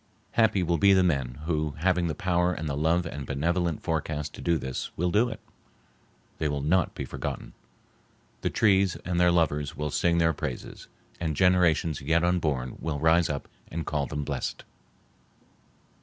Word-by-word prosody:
Happy 110 -5 +3
will 85 -1 +1
be 100 +4 +6
the 95 -1 +5
men 70 -6 -1
who, 75 -3 -1
having 90 +1 +1
the 80 - -2
power 90 0 +1
and 80 - -4
the 70 - -2
love 80 +4 +1
and 70 -4 -6
benevolent 85 +3 -1
forecast 75 -3 -2
to - - -9
do 85 -1 +2
this, 65 -2 -4
will 90 +1 0
do 110 +5 +3
it. 110 - -7 1.0
They 80 - +1
will 70 -1 -2
not 90 +4 +2
be - - -4
forgotten. - - -5 0.9
The - - 0
trees 95 -3 +3
and 90 0 0
their 90 0 +5
lovers 75 -4 +1
will 75 0 -2
sing 85 +3 +2
their 80 -1 +3
praises, 65 -3 -6 0.3
and 80 -3 -2
generations 85 -3 +3
yet 80 +4 +2
unborn 75 -8 0
will 75 -3 -2
rise 80 +2 +4
up 70 -2 -4 0.2
and 80 0 -4
call 75 -3 -1
them 75 -1 -3
blessed. - - -4
80 Hz, 170 wpm, -27 LUFS, 75-90 Hz, 1.0 s, be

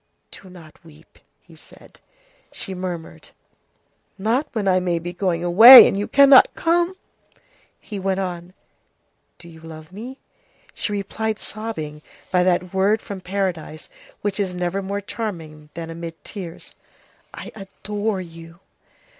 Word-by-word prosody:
"Do 190 - -14
not 170 -4 -16
weep," 155 -3 -20 0.2
he - - -19
said. - - -18 0.5
She 190 - -7
murmured:— 180 -3 -7 0.9
"Not 230 +9 0
when 215 -5 -2
I 185 -1 +3
may 180 -2 -1
be 175 +1 -6
going 175 -2 -2
away, 225 +9 +10
and - - -1
you 200 +1 -2
cannot 280 -1 +6
come!" 345 +2 0 0.8
He 205 -3 -8
went 190 0 -1
on:— 180 -1 -6 0.8
"Do 170 - -13
you 165 -1 -14
love 160 0 -12
me?" 240 +7 -9 0.6
She - - -4
replied, 210 +2 -3
sobbing, 160 -11 -6 0.3
by 180 -2 +3
that 180 0 0
word 200 +3 +2
from 200 -3 -8
paradise 180 -5 -4 0.3
which 205 -1 -3
is 185 -3 -2
never 180 +2 -2
more 200 +1 -4
charming 165 -9 -7
than 165 -1 -6
amid 165 0 -9
tears:— 180 -5 -9 0.6
"I - - -9
adore 205 0 -4
you!" 165 0 -13
185 Hz, 140 wpm, -21 LUFS, 170-205 Hz, 0.9 s, away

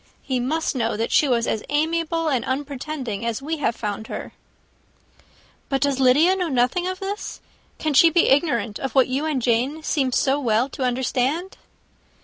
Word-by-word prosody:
He 260 -2 -1
must 305 +5 -1
know 230 -3 -1
that 225 - -2
she 300 - +4
was 235 -3 +1
as 220 - -1
amiable 330 +2 0
and 260 -6 +1
unpretending 270 -4 -4
as 230 -1 -2
we 310 +4 -3
have 270 -5 0
found 210 0 -4
her." - - -7 1.4
"But 270 - +1
does 280 -2 0
Lydia 290 +8 +5
know 365 -2 -1
nothing 260 +7 +1
of 370 0 -4
this? 400 +1 -5 0.4
can 310 -1 -1
she 330 +4 +7
be 340 +1 +3
ignorant 260 -8 +1
of 270 -1 -4
what 265 -2 +4
you 270 +4 -1
and 305 -4 0
Jane 255 +7 0
seem 270 -4 0
so 270 +3 +2
well 240 0 +1
to 270 - -9
understand?" 260 +8 -1
270 Hz, 175 wpm, -23 LUFS, 245-315 Hz, 1.4 s, she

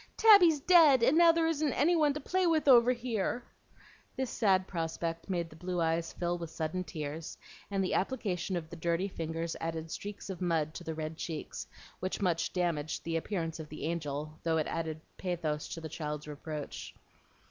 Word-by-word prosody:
Tabby's 385 -9 +7
dead, 300 -6 +6
and 270 - +5
now 335 0 +8
there 330 0 +1
isn't 310 -3 +1
any 330 +7 +3
one 305 -3 +4
to - - -2
play 370 +3 +1
with 315 -3 +2
over 245 -2 +7
here." 240 -1 -2 0.7
This 260 -2 -2
sad 190 -4 +3
prospect 165 0 -3
made 175 -3 -1
the - - -12
blue 180 +2 -3
eyes 165 0 0
fill 175 0 -2
with 170 -1 -5
sudden 160 +3 -3
tears; 155 -2 -6 0.3
and 195 -1 0
the 185 - -1
application 190 -4 -1
of 165 0 -6
the - - -6
dirty 170 +3 0
fingers 165 -2 -4
added 165 -1 -4
streaks 205 +4 -6
of 190 - -7
mud 160 -3 0
to 175 - -7
the 160 -1 -4
red 155 0 -4
cheeks, 160 -3 -5 0.3
which 185 - -3
much 170 -5 0
damaged 165 -4 -1
the 165 0 -2
appearance 165 -2 -3
of 155 -1 -7
the 155 - -8
angel, 155 -2 -3
thought 165 -1 +1
it 155 - 0
added 160 -1 -3 0.2
pathos 165 -5 -2
to - - -6
the 160 - -6
child's 150 -1 -5
reproach. 150 0 -6
170 Hz, 190 wpm, -31 LUFS, 160-230 Hz, 0.7 s, now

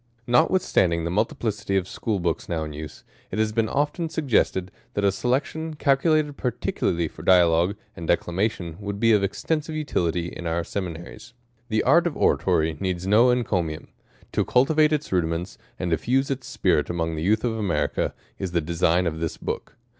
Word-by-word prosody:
NOTWITHSTAjYDIKG 120 - +3
the 85 - -2
multiplicity 105 -1 -1
of 95 - +1
School^ 105 +1 -2
Books 85 -2 -2
now 80 -2 -1
in 75 -1 -6
use, 75 +1 -8 0.3
it 95 - -5
has 110 0 +1
been 110 0 0
often 150 +4 -1
suggested, 115 - +1 0.2
that 100 - 0
a 100 - +4
Selection, 145 +9 -1
calculated 145 +1 +2
particularly 85 -8 -1
for - - -12
Dialogue 90 +1 +4 0.2
and 85 - -7
Declamation, 85 -1 -1
would 100 -1 -5
be 115 +1 +4
of 105 -2 +3
extensive 155 +9 -2
utility 90 - -1
in 85 - -7
our 85 +1 0
seminaries. 95 +5 -6 0.4
The 110 -1 +1
art 170 +7 +5
of 155 - -4
Oratory 80 -4 +2
needs 90 -1 -2
no 110 +6 +5
encomium. 90 -11 -1 0.4
To - - +1
cultivate 150 +4 +3
its 150 -1 -1
rudiments, 85 0 -1 0.2
and 90 -2 -2
diffuse 130 - +1
its 130 -1 -4
spirit - - +1
among 80 -1 -1
the 80 - -4
Youth 105 +6 +2
of 120 -2 0
America, 95 -9 -1 0.2
is 95 -2 -4
the 85 - +3
design 85 +2 +1
of 80 -2 -2
this 80 -1 -3
Book. - - -5
100 Hz, 170 wpm, -24 LUFS, 85-125 Hz, 0.4 s, art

